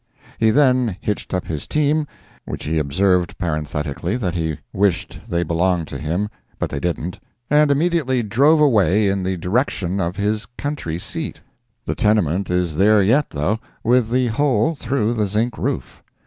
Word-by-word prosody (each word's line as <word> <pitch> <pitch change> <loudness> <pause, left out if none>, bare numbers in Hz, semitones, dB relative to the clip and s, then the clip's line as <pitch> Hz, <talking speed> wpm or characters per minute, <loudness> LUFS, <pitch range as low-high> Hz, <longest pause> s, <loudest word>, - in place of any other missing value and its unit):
He 110 - +4
then 125 -5 +3
hitched 105 - -3
up 90 -1 -1
his 75 -3 -5
team, 150 0 +1 0.4
which - - -6
he 80 +1 0
observed 90 +5 +1
parenthetically 75 - -2
that 95 -8 -2
he 80 -4 -2 0.2
wished 95 -3 0
they 85 0 +1
belonged 85 0 0
to 70 - -6
him, 85 +7 -1 0.3
but - - -3
they 70 - -2
didn't 85 +2 -3 0.3
and 150 0 +5
immediately 140 -4 +1
drove 140 +9 +4
away 105 -7 +4
in 95 0 0
the 95 0 -1
direction 95 - -1
of 85 0 -1
his 105 +2 -1
country 140 - -3
seat. 155 - -5 0.4
The - - -1
tenement 100 - +1
is 90 -3 0
there 105 +3 +5
yet, 130 +9 +3
though, 80 +9 -1 0.2
with 120 -1 +3
the 125 +1 +2
hole 125 +2 +2
through 120 -5 -1
the 105 -3 0
zinc 110 +4 0
roof. 65 - -3
100 Hz, 160 wpm, -20 LUFS, 85-125 Hz, 0.4 s, and